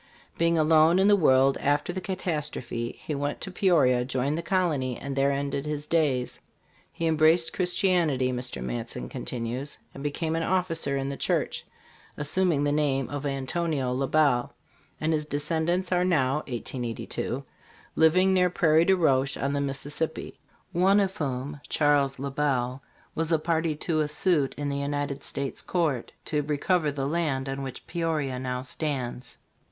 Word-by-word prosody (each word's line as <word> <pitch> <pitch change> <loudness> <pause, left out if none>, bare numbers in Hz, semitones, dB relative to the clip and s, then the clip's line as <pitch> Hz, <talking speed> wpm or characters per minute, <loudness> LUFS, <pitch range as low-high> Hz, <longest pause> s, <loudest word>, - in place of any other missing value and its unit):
Being 170 0 +2
alone 160 +2 +5
in 190 +1 +4
the 205 - +7
world 135 -6 +4
after 145 +4 0
the 185 - -4
catastrophe, 150 -10 -3
he 155 - -5
went 145 0 -2
to 190 - -4
Peoria, 150 -10 +3
joined 130 +3 -1
the 165 - -2
colony, 160 -9 0
and 140 -1 -5
there 140 +1 +3
ended 140 +1 -2
his 150 -1 -3
days. 145 -6 0 0.5
He 165 0 -3
embraced 160 +1 +3
Christi 180 +2 +1
anity," 145 -8 +2
Mr. 125 0 -3
Matson 120 -1 -4
continues, 125 +2 -4 0.2
"and 135 - -9
became 160 +2 -2
an 165 - 0
officer 165 -5 0
in 135 0 -2
the 140 - -4
church, - - -1 0.5
assum 175 +5 +1
ing 145 -2 +1
the 145 - +1
name 140 -3 +1
of 145 0 -3
Antonio 140 0 -1
La 135 +1 -1
Bell; 140 -6 +2 0.4
and 155 +1 +1
his 155 -1 0
descendants 160 +5 -1
are 180 0 +3
now 150 -7 +2
(1882) 120 -2 -4 0.5
living 185 +4 +4
near 180 -1 +4
Prairie 165 -2 +3
du 190 - +5
Rocher 140 -5 +2
[on 140 +1 -1
the 140 - 0
Mississippi], 145 +3 -3 0.3
one 190 +3 +4
of 195 -1 0
whom, 140 0 -3
Charles 145 -2 +2
La 140 +1 -4
Bell, 135 -2 0 0.3
was 165 +1 -1
a 165 - +5
party 160 0 0
to 155 +1 -1
a 155 - +1
suit 150 -2 +1
in 145 0 -2
the 140 - -2
United 140 0 -2
States 140 -1 -3
court 155 -9 -1
to 150 -1 0
recover 150 +2 +1
the 140 -1 -3
land 145 -4 -1
on 135 +1 -3
which 135 -2 -7
Peoria 155 -6 -2
now 125 0 -3
stands." 130 -3 -4
145 Hz, 165 wpm, -27 LUFS, 135-165 Hz, 0.5 s, the